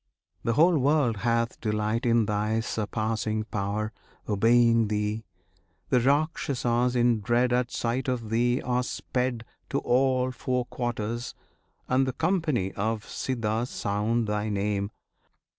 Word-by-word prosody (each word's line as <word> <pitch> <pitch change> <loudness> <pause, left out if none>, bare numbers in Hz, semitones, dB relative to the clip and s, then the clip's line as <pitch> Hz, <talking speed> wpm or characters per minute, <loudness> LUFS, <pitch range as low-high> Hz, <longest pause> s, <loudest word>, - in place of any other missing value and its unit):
The 115 - +1
whole 165 +4 +5
world 135 -4 +2
hath 115 +1 0
delight 110 +2 0
In 115 -1 +4
Thy 105 +2 0
surpassing 110 -1 -2
power, 110 0 -3 0.3
obeying 115 +2 +4
Thee; 105 +1 -2 0.6
The 125 - +4
Rakshasas, 130 -3 +1
in 120 -2 +3
dread 120 +4 +2
At 125 -1 +1
sight 120 +3 -2
of 120 -4 -2
Thee, 120 +2 +2
are 125 0 +1
sped 125 -1 -2 0.2
To - - 0
all 130 0 +2
four 125 0 -2
quarters; 120 -1 -3 0.5
and 130 +1 +2
the 130 - -1
company 160 - 0
Of 110 +2 -2
Siddhas 115 -1 -2
sound 110 +3 0
Thy 105 0 -1
name. 100 0 -1
115 Hz, 125 wpm, -27 LUFS, 110-125 Hz, 0.6 s, whole